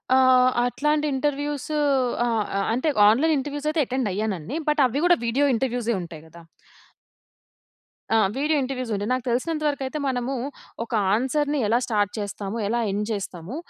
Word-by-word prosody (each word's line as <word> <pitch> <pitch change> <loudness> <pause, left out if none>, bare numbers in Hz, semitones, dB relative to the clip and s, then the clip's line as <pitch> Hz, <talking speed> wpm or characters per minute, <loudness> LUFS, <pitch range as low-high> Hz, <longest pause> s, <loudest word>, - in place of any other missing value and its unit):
ఆహ్, 255 -1 +5
అట్లాంటి 300 +5 0
ఇంటర్వ్యూస్ 290 +1 -2 0.6
ఆ! - - 0 0.3
ఆహ్, 195 - 0
అంటే 255 +7 0 0.2
ఆన్‌లైన్ 295 +9 +3
ఇంటర్వ్యూస్ 290 +2 -4
అయితే 310 0 +1
అటెండ్ 255 -3 -1
అయ్యానండి. 205 - -3
బట్ 300 -1 +2
అవి 255 +3 -1
కూడా 350 -1 +5
వీడియో 255 +5 +2
ఇంటర్వ్యూసే 240 -1 -1
ఉంటాయి 165 -3 -9
కదా! 170 +2 -14 1.7
ఆ! - - +5 0.2
వీడియో 300 +2 +1
ఇంటర్వ్యూస్ 255 -2 -4
ఉంటాయి. 205 +2 -3
నాకు 255 -1 -2
తెలిసినంత 305 +6 -1
వరకు 285 -1 -2
అయితే 285 +4 -4
మనము 255 0 -1 0.5
ఒక 230 - -12 0.2
ఆన్సర్‌ని 285 +5 0
ఎలా 230 +3 +3
స్టార్ట్ 205 -3 0
చేస్తాము 205 0 -4
ఎలా 235 +3 0
ఎండ్ 205 +2 -1
చేస్తాము. 195 0 -5
255 Hz, 155 wpm, -24 LUFS, 215-290 Hz, 1.7 s, ఆహ్